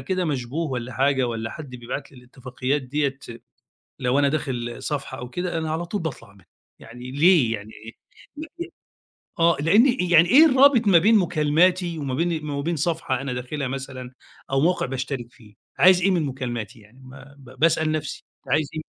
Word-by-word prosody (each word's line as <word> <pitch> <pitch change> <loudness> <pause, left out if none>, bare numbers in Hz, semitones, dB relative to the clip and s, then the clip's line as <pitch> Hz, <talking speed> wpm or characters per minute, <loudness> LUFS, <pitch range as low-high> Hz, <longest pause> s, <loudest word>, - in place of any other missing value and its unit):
كده 185 -1 -2
مشبوه 145 +2 -3
والَّا 125 0 -4
حاجة 135 0 +1
والَّا 115 -1 -4
حد 145 -1 -9
بيبعت 125 +3 -7
لي 130 - -15
الاتفاقيات 130 +2 -4
ديَّة 140 +1 -2 0.8
لو 130 +2 +1
أنا 140 -1 +3
داخل 125 -5 -3
صفحة 140 -3 -4
أو 125 0 -7
كده، 175 +2 -3
أنا 160 -1 -2
على 165 +2 -2
طول 200 +2 -4
باطلع 135 -10 -7
منها، 95 -2 -22 0.3
يعني 125 +3 -10
ليه 145 -5 +4
يعني 105 +2 -11
إيه 115 - -8 0.4
بب 320 +3 -8 0.7
آه، 170 0 +4
لأن 205 - +5 0.3
يعني 170 +1 +6
إيه 305 +8 +8
الرابط 260 -5 +5
ما 180 -4 +6
بين 215 +6 +5
مكالماتي 170 +1 +1
وما 135 -3 -3
بين 160 0 -2
وما 140 0 -3
بين 170 +3 -2
صفحة 160 -4 -1
أنا 135 -2 -4
داخلها 125 +3 -4
مثلًا 130 -1 -7 0.4
أو 135 0 +2
موقع 175 +3 +1
باشترك 130 -2 -5
فيه، 105 -2 -19 0.2
عايز 180 0 +6
إيه 195 +2 +3
من 170 -4 +1
مكالماتي، 120 -4 -5
يعني 110 +5 -20
ما 135 +2 -14
ب 130 -1 -16
باسأل 160 -1 +2
نفسي، 155 -1 -4
أنت 135 -2 -4
عايز 150 -1 +1
إيه؟ 155 - -4
140 Hz, 185 wpm, -23 LUFS, 125-165 Hz, 0.8 s, إيه